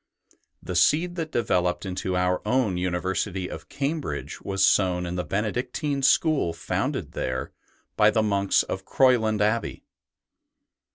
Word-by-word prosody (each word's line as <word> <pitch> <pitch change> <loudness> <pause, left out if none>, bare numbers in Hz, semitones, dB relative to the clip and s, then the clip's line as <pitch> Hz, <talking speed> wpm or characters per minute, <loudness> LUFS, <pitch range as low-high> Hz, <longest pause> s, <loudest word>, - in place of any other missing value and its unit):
The 90 - -5
seed 155 - +3
that 160 -2 -3
developed 90 -5 0
into 95 0 -2
our 90 0 +1
own 110 -3 +1
university 90 +1 -2
of - - -9
Cambridge 145 +2 -3
was 95 0 +1
sown 90 -3 +2
in 85 - -4
the 90 - -2
Benedictine 125 - -2
school 140 - +3
founded - - -3
there 65 0 -3 0.5
by 105 - +6
the 110 0 +1
monks 100 -2 +2
of 95 - -5
Croyland 110 -4 +2
Abbey. 110 +2 0
100 Hz, 130 wpm, -25 LUFS, 90-125 Hz, 0.5 s, by